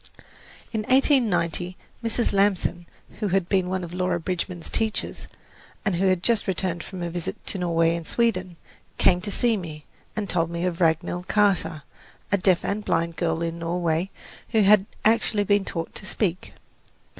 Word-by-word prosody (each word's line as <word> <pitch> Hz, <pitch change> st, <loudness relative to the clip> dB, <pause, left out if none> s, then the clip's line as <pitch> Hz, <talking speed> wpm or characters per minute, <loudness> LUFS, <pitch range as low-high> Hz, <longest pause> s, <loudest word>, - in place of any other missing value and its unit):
In 220 Hz, -, 0 dB
1890 210 Hz, -, +2 dB, 0.3 s
Mrs. 230 Hz, 0 st, +1 dB
Lamson, 195 Hz, -3 st, +1 dB, 0.3 s
who 210 Hz, -, 0 dB
had 190 Hz, -2 st, +1 dB
been 185 Hz, -2 st, +1 dB
one 185 Hz, 0 st, -1 dB
of 170 Hz, 0 st, -7 dB
Laura 180 Hz, -1 st, 0 dB
Bridgman's 175 Hz, 0 st, -4 dB
teachers, 220 Hz, -1 st, -2 dB, 0.6 s
and 195 Hz, -5 st, +1 dB
who 190 Hz, +2 st, +2 dB
had 185 Hz, -1 st, +2 dB
just 230 Hz, -3 st, +2 dB
returned 180 Hz, -2 st, -1 dB
from 185 Hz, -2 st, -7 dB
a 170 Hz, -, -3 dB
visit 175 Hz, -1 st, -4 dB
to 195 Hz, -, -3 dB
Norway 165 Hz, -1 st, +2 dB
and 170 Hz, -1 st, -6 dB
Sweden, 185 Hz, -7 st, 0 dB, 0.4 s
came 180 Hz, -1 st, +4 dB
to 205 Hz, -, -3 dB
see 230 Hz, +2 st, +2 dB
me, 155 Hz, -5 st, -7 dB, 0.3 s
and 210 Hz, -2 st, -2 dB
told 165 Hz, -2 st, 0 dB
me 170 Hz, +1 st, -2 dB
of 180 Hz, 0 st, -2 dB
Ragnhild 170 Hz, +2 st, +1 dB
Kaata, 180 Hz, -7 st, +2 dB, 0.5 s
a 200 Hz, -, +4 dB
deaf 185 Hz, -1 st, +3 dB
and 210 Hz, +1 st, -1 dB
blind 165 Hz, -2 st, 0 dB
girl 165 Hz, -1 st, 0 dB
in 165 Hz, 0 st, -3 dB
Norway 170 Hz, +1 st, 0 dB, 0.4 s
who 220 Hz, -2 st, +3 dB
had 200 Hz, 0 st, +5 dB, 0.2 s
actually 220 Hz, -1 st, +3 dB
been 205 Hz, 0 st, +2 dB
taught 165 Hz, -1 st, -4 dB
to -, -, -7 dB
speak. 185 Hz, -4 st, -2 dB
180 Hz, 170 wpm, -25 LUFS, 170-205 Hz, 0.6 s, had